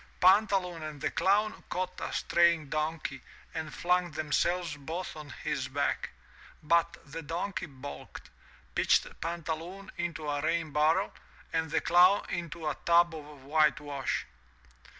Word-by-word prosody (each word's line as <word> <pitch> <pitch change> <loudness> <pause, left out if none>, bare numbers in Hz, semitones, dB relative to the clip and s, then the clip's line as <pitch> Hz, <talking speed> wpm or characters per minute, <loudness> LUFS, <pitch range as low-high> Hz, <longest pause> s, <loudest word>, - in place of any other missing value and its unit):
Pantaloon 185 -3 +4
and 155 -2 -6
the 150 - -1
Clown 210 +3 +2
caught 185 0 -3
a - - -3
straying 170 -4 +3
donkey 155 -3 -2 0.3
and 160 -2 -4
flung 180 +1 +1
themselves 165 +2 0
both 160 +6 -5
on 150 -2 -9
his 150 -4 -1
back, 140 +2 -1 0.5
but 170 +2 +3
the 145 +3 -6
donkey 175 +3 -3
balked, 140 0 -9 0.4
pitched - - +4 0.2
Pantaloon 170 +4 -4
into 170 -3 -3
a 145 -1 0
rain 160 -1 0
barrel 150 +2 +3 0.4
and 160 -1 0
the 160 +2 +1
Clown 180 +4 +5
into 170 -2 -4
a 150 - 0
tub 170 0 +5
of 150 -3 -10
whitewash. 145 -2 +1
165 Hz, 130 wpm, -30 LUFS, 150-175 Hz, 0.5 s, Clown